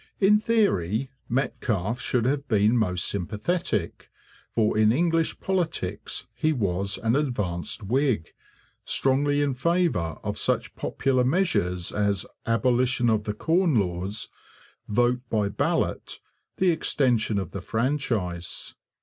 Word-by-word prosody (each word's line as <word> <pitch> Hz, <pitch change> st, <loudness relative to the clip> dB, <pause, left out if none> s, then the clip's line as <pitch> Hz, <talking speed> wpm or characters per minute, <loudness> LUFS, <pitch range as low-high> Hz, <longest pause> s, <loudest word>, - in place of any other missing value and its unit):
In 210 Hz, +2 st, +5 dB
theory 135 Hz, -, +1 dB, 0.2 s
Metcalfe 115 Hz, -3 st, -1 dB
should 120 Hz, -2 st, 0 dB
have 140 Hz, +2 st, 0 dB
been 105 Hz, 0 st, +3 dB
most 90 Hz, -6 st, +1 dB
sympathetic, 105 Hz, -, -2 dB, 0.5 s
for 110 Hz, -2 st, +2 dB
in 110 Hz, 0 st, +4 dB
English 165 Hz, +4 st, +1 dB
politics 170 Hz, -, -2 dB
he 155 Hz, -, +1 dB
was 100 Hz, -4 st, -1 dB
an 115 Hz, +2 st, +2 dB
advanced 105 Hz, -, -2 dB
Whig, 125 Hz, -, 0 dB, 0.5 s
strongly 145 Hz, +2 st, +2 dB
in 140 Hz, -2 st, 0 dB
favour 145 Hz, -, 0 dB
of -, -, -3 dB
such -, -, -1 dB
popular 130 Hz, -2 st, 0 dB
measures 125 Hz, -, +1 dB
as 100 Hz, -2 st, 0 dB, 0.2 s
abolition 120 Hz, +1 st, +2 dB
of 110 Hz, -1 st, 0 dB
the 105 Hz, -, -2 dB
Corn 165 Hz, -, +2 dB
Laws, 95 Hz, +2 st, -3 dB, 0.6 s
vote 120 Hz, +3 st, +2 dB
by 105 Hz, -2 st, +1 dB
ballot, -, -, -1 dB, 0.4 s
the 185 Hz, -1 st, +4 dB
extension 125 Hz, -9 st, +1 dB
of 95 Hz, -3 st, -3 dB
the 100 Hz, -, -5 dB
franchise. 110 Hz, -, -2 dB
120 Hz, 120 wpm, -26 LUFS, 100-145 Hz, 0.6 s, In